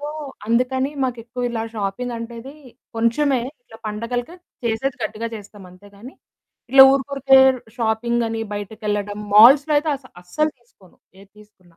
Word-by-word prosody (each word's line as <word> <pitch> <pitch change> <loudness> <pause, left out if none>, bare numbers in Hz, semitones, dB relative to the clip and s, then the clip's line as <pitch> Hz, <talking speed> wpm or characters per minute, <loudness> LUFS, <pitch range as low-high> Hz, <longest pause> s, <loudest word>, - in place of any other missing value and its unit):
So, 290 - -5 0.4
అందుకని 255 +4 0
మాకెక్కువ 240 0 -5
ఇలా 225 -1 -3
shopping 215 +4 -3
అంటే 230 +1 -7
అది 270 +4 -11 0.4
కొంచెమే. 245 +3 +1 0.2
ఇట్లా 225 -2 -16
పండగలకి 240 +8 -4 0.3
చేసేది 235 +3 -1
గట్టిగా 220 +2 -4
చేస్తాం 205 -2 -11
అంతే. 185 +3 -18
గానీ, 245 +7 -12 0.6
ఇట్లా 265 0 +9
ఊరుకూరికే 275 0 +3 0.4
షాపింగ్ 235 +1 0
అని, 225 0 -4
బయటికెళ్ళడం 205 0 -4 0.2
మాల్స్‌‌లో 275 +8 +7
అయితే 305 +1 -2
అస 265 - -21 0.2
అస్సలు 305 +13 -1
తీసుకోను. 200 -6 -24 0.2
ఏది 195 0 -18
తీసుకున్నా. 185 -5 -22
230 Hz, 140 wpm, -21 LUFS, 210-265 Hz, 0.6 s, ఇట్లా